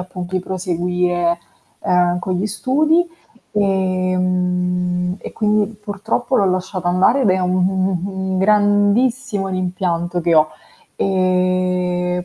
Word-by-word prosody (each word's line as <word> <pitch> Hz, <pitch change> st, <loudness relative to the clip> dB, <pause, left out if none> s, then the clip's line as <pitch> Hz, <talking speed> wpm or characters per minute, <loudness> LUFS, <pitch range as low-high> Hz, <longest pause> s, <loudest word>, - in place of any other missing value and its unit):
appunto 180 Hz, 0 st, -7 dB
di 185 Hz, -, +1 dB
proseguire, 180 Hz, -1 st, -1 dB, 0.4 s
ehm, 180 Hz, 0 st, +2 dB
con 185 Hz, +1 st, -3 dB
gli 185 Hz, +3 st, -1 dB
studi. 305 Hz, -, +2 dB, 0.5 s
Ehm. 180 Hz, -2 st, 0 dB
E -, -, -8 dB
quindi 210 Hz, -1 st, +1 dB, 0.2 s
purtroppo 215 Hz, +5 st, -2 dB
l'ho 200 Hz, -, +3 dB
lasciata 185 Hz, -1 st, -2 dB
andare 185 Hz, +9 st, +3 dB
ed 215 Hz, -, +3 dB
è 185 Hz, -, +2 dB
un 180 Hz, 0 st, 0 dB
un 185 Hz, +1 st, +1 dB
un 185 Hz, -1 st, -2 dB
un 190 Hz, -1 st, -3 dB
grandissimo 205 Hz, +2 st, +2 dB
rimpianto 180 Hz, -2 st, -2 dB
che 170 Hz, 0 st, +2 dB
ho. 155 Hz, -1 st, +5 dB, 0.5 s
Ehm. 180 Hz, -1 st, 0 dB
185 Hz, 125 wpm, -19 LUFS, 180-195 Hz, 0.5 s, ho